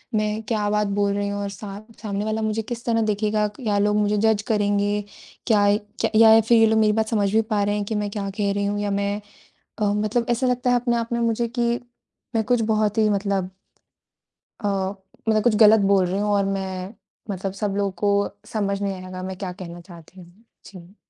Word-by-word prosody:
मैं 215 Hz, +1 st, 0 dB
क्या 210 Hz, -3 st, 0 dB
बात 210 Hz, 0 st, +1 dB
बोल 200 Hz, 0 st, +2 dB
रही 200 Hz, 0 st, -1 dB
हूँ 205 Hz, 0 st, -3 dB
और 200 Hz, -, -3 dB
सा 200 Hz, 0 st, -8 dB, 0.2 s
सामने 205 Hz, -1 st, -3 dB
वाला 220 Hz, 0 st, -1 dB
मुझे 220 Hz, 0 st, -1 dB
किस 235 Hz, +1 st, -7 dB
तरह 230 Hz, -1 st, +1 dB
देखेगा। 210 Hz, 0 st, +1 dB
क्या 210 Hz, -1 st, -2 dB
लोग 210 Hz, +1 st, +2 dB
मुझे 210 Hz, 0 st, +1 dB
जज 220 Hz, 0 st, +2 dB
करेंगे 205 Hz, 0 st, +1 dB, 0.5 s
क्या 205 Hz, -3 st, +4 dB, 0.4 s
क -, -, -1 dB
या 225 Hz, 0 st, +8 dB
फिर 230 Hz, +2 st, +4 dB
ये 225 Hz, -, +6 dB
लोग 220 Hz, 0 st, +3 dB
मेरी 215 Hz, -1 st, +3 dB
बात 220 Hz, 0 st, 0 dB
समझ 205 Hz, -3 st, +1 dB
भी 225 Hz, -, +5 dB
पा 215 Hz, -2 st, -1 dB
रहे 205 Hz, +1 st, 0 dB
हैं 205 Hz, -, -1 dB
कि 220 Hz, -, -3 dB
मैं 210 Hz, -1 st, -1 dB
क्या 200 Hz, -2 st, -3 dB
कह 200 Hz, -1 st, +1 dB
रही 200 Hz, 0 st, -1 dB
हूँ 205 Hz, 0 st, -1 dB
या 205 Hz, -1 st, -1 dB
मैं 200 Hz, +1 st, -1 dB, 0.6 s
अ, -, -, 0 dB
मतलब 215 Hz, +3 st, 0 dB
ऐसा 240 Hz, +2 st, +1 dB
लगता 250 Hz, 0 st, 0 dB
है 245 Hz, -, +4 dB
अपने 240 Hz, -1 st, +1 dB
आप 230 Hz, 0 st, -3 dB
में 235 Hz, -, 0 dB
मुझे 230 Hz, 0 st, 0 dB
कि 235 Hz, 0 st, +1 dB, 0.6 s
मैं 220 Hz, -, +2 dB
कुछ 245 Hz, +1 st, +1 dB
बहुत 215 Hz, -1 st, +1 dB
ही 215 Hz, -1 st, +4 dB
मतलब 195 Hz, -2 st, 0 dB, 1.1 s
अ, 205 Hz, -, -2 dB, 0.6 s
मतलब 215 Hz, -1 st, +3 dB
कुछ 235 Hz, -3 st, +3 dB
गलत 215 Hz, 0 st, +7 dB
बोल 195 Hz, -2 st, +4 dB
रही 190 Hz, +3 st, -2 dB
हूँ 210 Hz, 0 st, 0 dB
और 200 Hz, -1 st, +2 dB
मैं 190 Hz, 0 st, -4 dB, 0.4 s
मतलब 190 Hz, 0 st, -3 dB
सब 200 Hz, -1 st, -2 dB
लोगों 200 Hz, -1 st, 0 dB
को 200 Hz, 0 st, +2 dB, 0.2 s
समझ 200 Hz, -2 st, -1 dB
नहीं 200 Hz, -1 st, -1 dB
आएगा 185 Hz, 0 st, -7 dB
मैं 185 Hz, 0 st, -5 dB
क्या 190 Hz, -2 st, -4 dB
कहना 175 Hz, -2 st, -9 dB
चाहती 175 Hz, +1 st, -15 dB
हूँ। 180 Hz, +7 st, -19 dB, 0.2 s
जी। 185 Hz, +1 st, -13 dB
210 Hz, 220 wpm, -23 LUFS, 200-220 Hz, 1.1 s, या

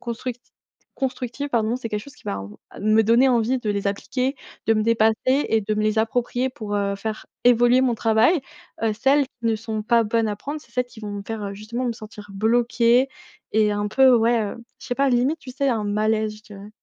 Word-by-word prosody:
constructi 240 Hz, +1 st, -6 dB, 0.5 s
constructives 265 Hz, +1 st, -3 dB
pardon, 230 Hz, -2 st, +1 dB
c'est 250 Hz, -2 st, -4 dB
quelque 210 Hz, -1 st, -2 dB
chose 280 Hz, +2 st, -13 dB
qui -, -, -21 dB
va, 100 Hz, -, -3 dB, 0.4 s
hem, 215 Hz, +1 st, 0 dB
me 220 Hz, -, +6 dB
donner 235 Hz, +5 st, +4 dB
envie 245 Hz, +1 st, +2 dB
de 225 Hz, -4 st, -5 dB
les 200 Hz, -1 st, 0 dB
appliquer, 255 Hz, +7 st, -2 dB, 0.3 s
de 225 Hz, -, +5 dB
me 215 Hz, -, +1 dB
dépasser 220 Hz, -1 st, +3 dB
et 260 Hz, -4 st, +2 dB
de 215 Hz, +1 st, -2 dB
me 215 Hz, -, 0 dB
les 215 Hz, +1 st, +1 dB
approprier 245 Hz, +3 st, 0 dB
pour, 215 Hz, -6 st, -4 dB
heu, 200 Hz, -1 st, 0 dB
faire 215 Hz, +2 st, -5 dB, 0.2 s
évoluer 245 Hz, +1 st, +5 dB
mon 255 Hz, -3 st, +2 dB
travail. 225 Hz, +10 st, +3 dB, 0.4 s
Heu, 225 Hz, -1 st, +1 dB
celles 275 Hz, +5 st, +3 dB
qui 255 Hz, -, -37 dB
ne 225 Hz, -1 st, +1 dB
sont 220 Hz, -1 st, -4 dB
pas 230 Hz, +1 st, +3 dB
bonnes 225 Hz, +1 st, +1 dB
à 205 Hz, -, -3 dB
prendre, 290 Hz, +7 st, -6 dB
c'est 235 Hz, -, -21 dB
celles 250 Hz, +1 st, 0 dB
qui 235 Hz, -2 st, -14 dB
vont 210 Hz, -1 st, -6 dB
me 200 Hz, 0 st, -5 dB
faire, 210 Hz, -3 st, -4 dB
justement 215 Hz, +5 st, -5 dB
me 240 Hz, -, 0 dB
sentir 215 Hz, -2 st, -11 dB
bloquée 235 Hz, +4 st, +3 dB, 0.4 s
et 215 Hz, -1 st, +3 dB
un 205 Hz, 0 st, -1 dB
peu 260 Hz, +3 st, +5 dB
ouais, 230 Hz, 0 st, +3 dB
heu, 210 Hz, -2 st, -3 dB, 0.2 s
je -, -, -10 dB
sais 245 Hz, -, -2 dB
pas 275 Hz, 0 st, +2 dB
limite 260 Hz, +6 st, +1 dB
tu 260 Hz, -, -9 dB
sais 275 Hz, +2 st, -1 dB
un 225 Hz, -4 st, 0 dB
malaise, 215 Hz, +1 st, 0 dB
je 215 Hz, -, -17 dB
dirais. 205 Hz, -1 st, -11 dB
225 Hz, 225 wpm, -23 LUFS, 215-250 Hz, 0.5 s, me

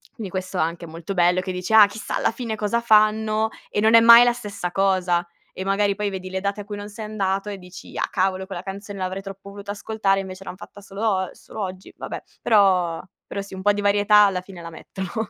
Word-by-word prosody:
Quindi 205 Hz, -5 st, -7 dB
questo 185 Hz, 0 st, -4 dB
anche 170 Hz, +1 st, -1 dB
è -, -, -11 dB
molto 165 Hz, +4 st, -6 dB
bello, 180 Hz, 0 st, +3 dB
che 185 Hz, 0 st, -4 dB
dici: 180 Hz, +3 st, -5 dB
"Ah 215 Hz, -2 st, +10 dB
chissà 215 Hz, +2 st, -5 dB
alla -, -, +1 dB
fine 230 Hz, -1 st, -4 dB
cosa 215 Hz, +2 st, -1 dB
fanno?" 215 Hz, 0 st, +3 dB, 0.2 s
E -, -, -2 dB
non 220 Hz, +1 st, +4 dB
è -, -, +10 dB
mai 235 Hz, +1 st, +10 dB
la 240 Hz, -, +3 dB
stessa 205 Hz, -6 st, -5 dB
cosa. 185 Hz, -3 st, +1 dB, 0.3 s
E 190 Hz, -, -5 dB
magari 200 Hz, +1 st, +2 dB
poi 210 Hz, 0 st, -2 dB
vedi 185 Hz, -1 st, -6 dB
le 190 Hz, -, -2 dB
date 200 Hz, +1 st, -2 dB
a -, -, -10 dB
cui 205 Hz, 0 st, -6 dB
non 205 Hz, 0 st, -7 dB
sei 215 Hz, +1 st, -7 dB
andato 200 Hz, -1 st, -2 dB
e 200 Hz, -, -5 dB
dici: 180 Hz, +1 st, -12 dB
"Ah, -, -, 0 dB
cavolo, 190 Hz, 0 st, 0 dB
quella 185 Hz, -3 st, -6 dB
canzone 200 Hz, +1 st, -7 dB
l'avrei 185 Hz, +1 st, -3 dB
troppo 195 Hz, 0 st, -10 dB
voluta 200 Hz, 0 st, -10 dB
ascoltare, 200 Hz, -2 st, 0 dB
invece 190 Hz, 0 st, -9 dB
l'han 185 Hz, -, -7 dB
fatta 205 Hz, -, -12 dB
solo 195 Hz, +1 st, -9 dB
og 190 Hz, -3 st, 0 dB
solo 215 Hz, -, -9 dB
oggi, 185 Hz, -1 st, -6 dB
vabbè". -, -, -6 dB, 0.2 s
Però, 185 Hz, -6 st, +3 dB, 0.3 s
però 200 Hz, -, -4 dB
sì, 195 Hz, -, -11 dB
un 190 Hz, -, -7 dB
po' 205 Hz, +1 st, +4 dB
di 205 Hz, -, -3 dB
varietà, 205 Hz, +1 st, +4 dB
alla 190 Hz, -2 st, 0 dB
fine, 185 Hz, -2 st, -12 dB
la 165 Hz, -, -7 dB
mettono. 190 Hz, +6 st, -6 dB
195 Hz, 240 wpm, -23 LUFS, 185-210 Hz, 0.3 s, Ah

